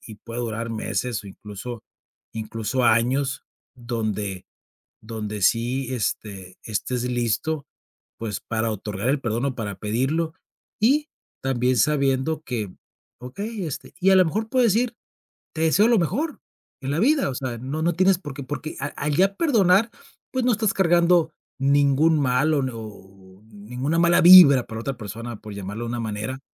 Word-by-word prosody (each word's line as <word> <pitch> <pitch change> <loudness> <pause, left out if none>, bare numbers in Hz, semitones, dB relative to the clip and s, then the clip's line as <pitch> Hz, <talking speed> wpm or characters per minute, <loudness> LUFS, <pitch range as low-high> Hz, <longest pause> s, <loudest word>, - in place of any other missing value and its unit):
y 110 - -9
puede 115 +3 -7
durar 115 0 -3
meses 115 +1 -3
o - - -10
incluso 105 +4 -8 0.5
incluso 115 +3 -2
años 130 +5 +2 0.3
donde 110 -5 -3 0.6
donde 105 -2 -5
sí, 125 +5 +1
este, 100 -5 -4
estés 120 +3 -2
listo, 125 +5 -1 0.5
pues 110 -2 -4
para 115 0 -2
otorgar 105 +1 -4
el 140 +1 +1
perdón 120 0 -2
o 130 - -2
para 105 -4 -4
pedirlo, 135 +10 -1 0.5
y 290 +7 +3 0.3
también 130 -1 +1
sabiendo 140 +3 +1
que, 110 - -4 0.5
okey, 200 - -5
este, 150 - -7
y 195 - +4
a 190 - +6
lo 185 - +6
mejor 215 +7 -2
puedes 235 -4 +3
ir, 240 +1 0 0.6
te 160 - -4
deseo 195 +7 +4
lo 235 -4 +4
mejor 290 - -2 0.4
en 135 - -4
la 145 - -1
vida, 280 - +3
o 130 - -4
sea, 125 -3 -4
no 140 +5 -4
no 170 0 +2
tienes 185 +1 +3
porqué 145 -5 -8
porque 145 +3 -6
al 140 - -4
al 145 0 -1
ya 195 +3 +3
perdonar, 220 - +3 0.4
pues 255 -1 -1
no 250 - +4
estás 215 -1 0
cargando 170 -2 +3 0.3
ningún 145 +3 +3
mal 140 +3 +2
o 140 - +1
n 130 - -2
o 100 -3 -12
ninguna 125 +10 -3
mala 170 0 +4
vibra 165 -8 +9
para 110 0 -6
otra 135 +2 -4
persona, 115 +1 -7
por 105 - -9
llamarlo 100 +3 -6
de 115 - -4
una 120 0 -3
manera. 110 +4 -4
130 Hz, 165 wpm, -23 LUFS, 110-165 Hz, 0.6 s, vibra